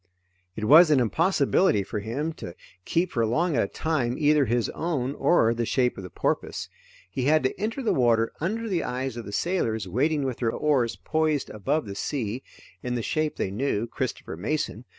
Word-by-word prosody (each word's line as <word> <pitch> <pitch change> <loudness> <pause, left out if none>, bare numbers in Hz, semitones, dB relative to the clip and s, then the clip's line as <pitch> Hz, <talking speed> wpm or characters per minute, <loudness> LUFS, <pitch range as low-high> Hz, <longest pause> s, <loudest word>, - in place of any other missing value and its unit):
It 110 - -3
was 155 +8 +8
an 150 -3 +5
impossibility 145 - +2
for 105 +2 -4
him 135 +10 -3
to 85 - -9 0.3
keep 175 +2 0
for 115 - 0
long 155 +9 +1
at 115 - +3
a - - 0
time, 135 -5 -1
either 150 -1 +4
his 120 0 +1
own, 140 -6 -2
or 115 -8 +3
the 120 0 -2
shape 125 +1 +1
of - - -7
the 90 - -8
porpoise. - - -2 0.4
He 125 +6 -2
had 155 +1 +4
to 130 - -1
enter 230 +5 -2
the 230 - +2
water 115 -3 +2
under 225 +7 -2
the 180 -6 0
eyes 125 0 -3
of 120 -2 -6
the 100 - -7
sailors 110 - -1
waiting 145 - +1
with 130 -3 -2
their 115 -2 +1
oars 130 -6 +1
poised 155 -2 -1
above 110 +9 -1
the 100 - -6
sea, 115 +2 -3 0.4
in 125 -1 -3
the 120 - -2
shape 155 +4 -1
they 95 - -2
knew; 115 0 -1
Christopher 120 - -4
Mason. 115 - -3
130 Hz, 195 wpm, -26 LUFS, 115-155 Hz, 0.4 s, was